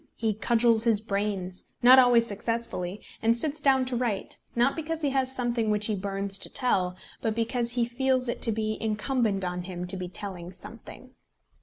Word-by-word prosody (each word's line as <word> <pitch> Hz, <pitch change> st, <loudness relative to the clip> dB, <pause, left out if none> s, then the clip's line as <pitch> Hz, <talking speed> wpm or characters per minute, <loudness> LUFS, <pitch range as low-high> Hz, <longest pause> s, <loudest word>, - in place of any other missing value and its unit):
He 220 Hz, -2 st, 0 dB
cudgels 230 Hz, +1 st, +3 dB
his 225 Hz, -3 st, +3 dB
brains, 200 Hz, -3 st, -3 dB, 0.2 s
not 255 Hz, +2 st, +9 dB
always 245 Hz, -2 st, +5 dB
successfully, 210 Hz, -3 st, -3 dB, 0.2 s
and 230 Hz, +1 st, +3 dB
sits 300 Hz, +4 st, 0 dB
down 265 Hz, -2 st, +3 dB
to 255 Hz, -1 st, -3 dB
write, 235 Hz, -5 st, -2 dB, 0.2 s
not 245 Hz, +4 st, +2 dB
because 325 Hz, 0 st, -4 dB
he 285 Hz, -, +1 dB
has 265 Hz, -1 st, +1 dB
something 240 Hz, -3 st, -1 dB
which 210 Hz, 0 st, +1 dB
he 215 Hz, -, +1 dB
burns 195 Hz, 0 st, -2 dB
to -, -, -3 dB
tell, 185 Hz, -8 st, +2 dB, 0.3 s
but 220 Hz, -1 st, -1 dB
because 235 Hz, +1 st, 0 dB
he 240 Hz, -1 st, +1 dB
feels 255 Hz, +1 st, 0 dB
it 240 Hz, -, -3 dB
to 230 Hz, -, +4 dB
be 215 Hz, 0 st, -2 dB
incumbent 215 Hz, -2 st, 0 dB
on 180 Hz, 0 st, -3 dB
him 180 Hz, 0 st, -6 dB
to 190 Hz, +2 st, -3 dB
be 180 Hz, -1 st, -5 dB
telling 180 Hz, -2 st, -5 dB
something. 230 Hz, +6 st, -11 dB
225 Hz, 185 wpm, -27 LUFS, 200-245 Hz, 0.3 s, not